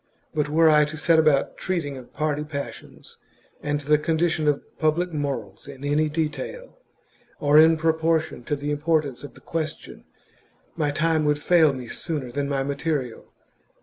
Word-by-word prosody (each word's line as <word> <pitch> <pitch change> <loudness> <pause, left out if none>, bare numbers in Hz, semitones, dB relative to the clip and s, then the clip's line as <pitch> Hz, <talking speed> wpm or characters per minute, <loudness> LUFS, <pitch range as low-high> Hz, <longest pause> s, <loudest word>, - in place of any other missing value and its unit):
But 150 -1 0
were 160 +2 +4
I 150 -1 +6
to 150 +1 -7
set 160 +1 +3
about 155 -3 +2
treating 165 -7 -2
of 130 -2 -11
party 150 -1 -1
passions 140 -7 -8 0.4
and 145 0 -1
the 150 +1 +3
condi 165 +2 +1
tion 155 -1 -1
of 145 -1 +1 0.2
public 165 +3 +1
morals 135 -10 -4
in 140 -1 -10
any 150 +2 +1
detail, 155 - -4 0.6
or 145 0 +5
in 160 +1 +6
proportion 160 -3 0
to 145 - -1
the 145 +1 -4
importance 145 -3 0
of 140 -4 -10
the - - -16
question, 160 -2 -5 0.7
my 150 -3 0
time 160 +2 +1
would 150 0 +2
fail 160 0 +4
me 130 -3 -7
sooner 140 0 -4
than 140 +2 -2
my 135 -1 0
material. 140 -3 -3
150 Hz, 165 wpm, -24 LUFS, 140-160 Hz, 0.7 s, I